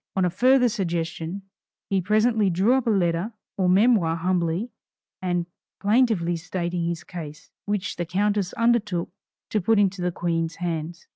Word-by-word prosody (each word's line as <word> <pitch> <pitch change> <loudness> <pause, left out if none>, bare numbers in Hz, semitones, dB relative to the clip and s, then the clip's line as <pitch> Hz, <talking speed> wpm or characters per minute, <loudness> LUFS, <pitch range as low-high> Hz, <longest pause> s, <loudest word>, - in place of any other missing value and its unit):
On 190 -1 +2
a 180 - 0
further 250 +6 +4
suggestion, 170 -3 -3 0.4
he 195 -1 +1
presently 215 +2 +2
drew 190 +7 +3
up 265 -2 +1
a - - +4
letter 185 +1 +1 0.2
or 185 -2 +1
memoir 190 -4 +4
humbly 175 +5 -1 0.5
and 175 -2 0 0.3
plaintively 205 -5 +2
stating 175 0 -3
his 170 0 -3
case, 155 -3 -9
which 205 -2 -2
the 175 - -2
countess 200 +1 0
undertook 220 -7 +1 0.4
to 215 - +1
put 225 +5 +3
into 195 -2 +2
the 180 0 0
Queen's 165 -1 -2
hands. 170 -1 -4
185 Hz, 150 wpm, -24 LUFS, 170-210 Hz, 0.5 s, further